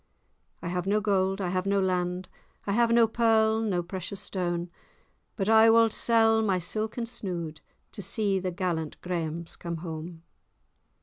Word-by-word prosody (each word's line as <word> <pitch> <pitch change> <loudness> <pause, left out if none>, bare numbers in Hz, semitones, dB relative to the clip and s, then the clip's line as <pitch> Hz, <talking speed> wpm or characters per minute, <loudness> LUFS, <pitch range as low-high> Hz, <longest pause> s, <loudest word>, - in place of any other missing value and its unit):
I - - -3
have 180 +1 -2
no 210 +2 +3
gold, 195 -2 +1
I 180 - -1
have 185 +1 -1
no 200 0 +2
land, 180 -1 -1 0.4
I 200 - -1
have 235 +3 +3
no 230 0 +5
pearl 220 -1 +3
nor 190 -6 0
precious 190 +2 -6
stane; 175 -2 -3 0.6
But 195 -2 -2
I 220 0 +7
wald 225 -1 +5
sell 225 -1 +3
my 200 -4 +1
silken 215 +6 -3
snood, 175 -9 -5 0.3
To - - -7
see 200 0 0
the 185 0 -2
gallant 170 -3 -3
Grahams 170 -2 -4
come 170 -1 -5
hame. 165 0 -7
190 Hz, 160 wpm, -28 LUFS, 175-220 Hz, 0.6 s, I